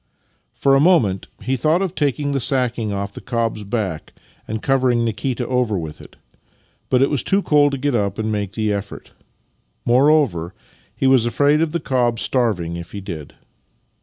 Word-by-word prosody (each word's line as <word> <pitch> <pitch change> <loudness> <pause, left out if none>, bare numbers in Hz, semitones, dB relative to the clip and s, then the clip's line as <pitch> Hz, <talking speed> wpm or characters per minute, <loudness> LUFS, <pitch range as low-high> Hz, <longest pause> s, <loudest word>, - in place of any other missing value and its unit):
For 135 - +2
a 135 - +5
moment 130 - +3 0.2
he 130 +2 0
thought 155 +8 +2
of 185 -3 -3
taking 145 -2 -1
the 140 - 0
sacking 120 -4 0
off 100 0 -4
the - - -9
cob's 115 -3 -2
back 100 -6 -4 0.3
and 110 +1 -3
covering 125 -2 +2
Nikita 125 +2 -2
over 125 -5 0
with 80 -3 -6
it, - - -15 0.7
but 130 0 +4
it 140 - +1
was 145 - +1
too 195 0 +1
cold 145 -1 +4
to - - -1
get 140 +1 -1
up 100 -4 0
and 110 0 -2
make 105 -2 -3
the 110 -2 0
effort. 100 0 -6 0.7
Moreover, 125 - +3 0.4
he - - -2
was 130 -3 +4
afraid 145 +5 +2
of 165 -2 0
the 170 - -1
cob 125 -5 0
starving 95 -10 0
if 85 -1 -9
he 100 - -5
did. 85 -7 -8
120 Hz, 180 wpm, -20 LUFS, 105-140 Hz, 0.7 s, a